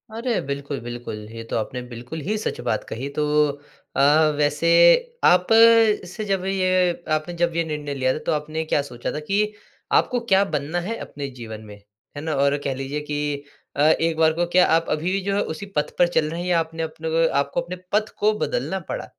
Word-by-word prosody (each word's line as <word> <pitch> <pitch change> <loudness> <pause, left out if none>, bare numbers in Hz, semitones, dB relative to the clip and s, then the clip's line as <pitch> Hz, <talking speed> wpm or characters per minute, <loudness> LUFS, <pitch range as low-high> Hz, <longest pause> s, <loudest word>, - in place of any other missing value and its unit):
अरे! 235 0 -1
बिल्कुल, 140 0 -4
बिल्कुल। 120 -2 -6 0.2
ये 115 - -6
तो - - -4
आपने 125 +3 -3
बिल्कुल 120 +6 -7
ही 215 +1 0
सच 215 - -3
बात 110 - 0
कही। 130 +5 -4
तो 150 - +2 0.7
अ, - - -1 0.4
वैसे 150 +2 +1 0.6
आप 180 0 +5 0.6
से 210 +5 -6
जब 195 -2 -1
ये 185 -2 +2 0.2
आपने 155 +3 -1
जब 170 -1 0
ये 170 - +2
निर्णय 150 -2 -4
लिया 130 -1 +1
था - - -4
तो - - +1
आपने 155 +1 -2
क्या 145 - +1
सोचा 125 -4 -5
था - - -4
कि 195 +7 0 0.6
आपको 250 - -1
क्या 195 0 +5
बनना 150 +5 -2
है 230 - -2
अपने 145 -8 -6
जीवन 110 -2 -7
में? 105 -1 -11 0.4
है - - -4
ना 160 -1 -2
और 140 +1 +2
कह 135 - -2
लीजिए 135 +3 -4
कि 145 -1 -2 0.3
अ, 140 - 0
एक 160 +1 +3
बार 160 -1 +4
को 175 +1 0
क्या 180 - +7
आप 165 - -2
अभी-भी 185 +6 0
जो 200 0 0
है 205 - +2
उसी 200 - -7
पथ 150 - -1
पर 175 - +6
चल 160 -3 +1
रहे 165 +2 -4
हैं 180 - -4
या 175 -2 +3
आपने 165 0 -3
अपने 160 0 -5
को 165 0 +3
आपको 140 +4 -1
अपने 175 +2 -6 0.2
पथ 215 +1 +2
को 215 +1 +3
बदलना - - -1
पड़ा? - - -4
160 Hz, 215 wpm, -23 LUFS, 140-180 Hz, 0.7 s, क्या